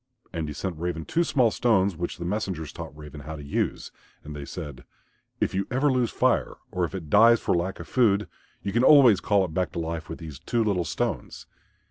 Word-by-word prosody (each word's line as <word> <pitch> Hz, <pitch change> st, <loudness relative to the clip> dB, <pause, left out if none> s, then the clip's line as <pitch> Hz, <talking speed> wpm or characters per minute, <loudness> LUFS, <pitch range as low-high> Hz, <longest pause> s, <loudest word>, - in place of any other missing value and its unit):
And 80 Hz, -2 st, -3 dB
he 75 Hz, -, -5 dB
sent 85 Hz, +1 st, -4 dB
Raven 85 Hz, -2 st, -3 dB
two 170 Hz, -, +1 dB
small 130 Hz, -8 st, +2 dB
stones 100 Hz, -6 st, +2 dB
which 85 Hz, +1 st, -4 dB
the 85 Hz, -, -5 dB
messengers 90 Hz, -5 st, -3 dB
taught 80 Hz, -3 st, -8 dB
Raven 75 Hz, -1 st, -10 dB
how 80 Hz, +3 st, -7 dB
to 75 Hz, -, -9 dB
use. 70 Hz, -, -2 dB, 0.3 s
And 75 Hz, 0 st, -8 dB
they 70 Hz, -1 st, -6 dB
said, 70 Hz, -6 st, -7 dB, 0.6 s
"If -, -, 0 dB
you 95 Hz, +1 st, -1 dB
ever 135 Hz, +3 st, +2 dB
lose 125 Hz, -3 st, +1 dB
Fire -, -, +1 dB, 0.2 s
or 90 Hz, -1 st, 0 dB
if 85 Hz, -, -7 dB
it 80 Hz, -6 st, -7 dB
dies 115 Hz, +2 st, +7 dB
for -, -, 0 dB
lack 90 Hz, +3 st, -2 dB
of -, -, -8 dB
food 105 Hz, -5 st, +2 dB, 0.4 s
you 100 Hz, -, -3 dB
can 120 Hz, +2 st, +3 dB
always 130 Hz, -8 st, +7 dB
call 100 Hz, -2 st, +2 dB
it 80 Hz, -, -8 dB
back 90 Hz, +2 st, 0 dB
to 85 Hz, -, -3 dB
life 80 Hz, -2 st, -4 dB
with 80 Hz, -, -5 dB
these 80 Hz, -5 st, -9 dB
two 115 Hz, +8 st, 0 dB
little 95 Hz, -5 st, 0 dB
stones." -, -, -3 dB
90 Hz, 220 wpm, -26 LUFS, 80-110 Hz, 0.6 s, dies